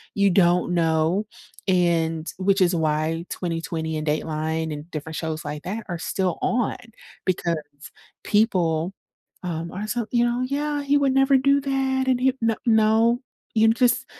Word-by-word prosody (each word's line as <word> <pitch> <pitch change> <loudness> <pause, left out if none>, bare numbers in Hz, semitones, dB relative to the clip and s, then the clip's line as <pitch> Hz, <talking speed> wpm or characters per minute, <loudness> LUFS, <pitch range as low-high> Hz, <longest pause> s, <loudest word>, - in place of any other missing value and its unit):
You 200 0 +4
don't 175 -1 +3
know, 165 +4 +1 0.4
and, 165 -3 +1
which 195 +1 +2
is 180 0 +3
why 160 +1 0
20/20 165 -2 -3
and 155 - -4
Dateline 155 +1 -1
and 150 +3 -8
different 155 +1 -6
shows 160 -1 -4
like 145 0 -5
that 210 +5 -5
are 175 -2 -3
still 185 0 -1
on, 240 -2 0 0.5
because 170 -4 -1 0.6
people, 180 -5 +1 0.5
um, 170 -1 -4
are 210 +3 -5
so, 240 -1 -2
you 240 -1 +3
know, 240 +1 0
"Yeah, 290 +1 -2
he 285 +1 +3
would 275 -2 +2
never 270 0 +4
do 275 +1 +3
that, 265 -1 0
and 250 -1 +2
he 265 0 +3
"N 225 -1 +2
no, 225 +2 +3 0.3
you 220 0 +5
just 240 +2 +2
185 Hz, 155 wpm, -24 LUFS, 160-240 Hz, 0.6 s, you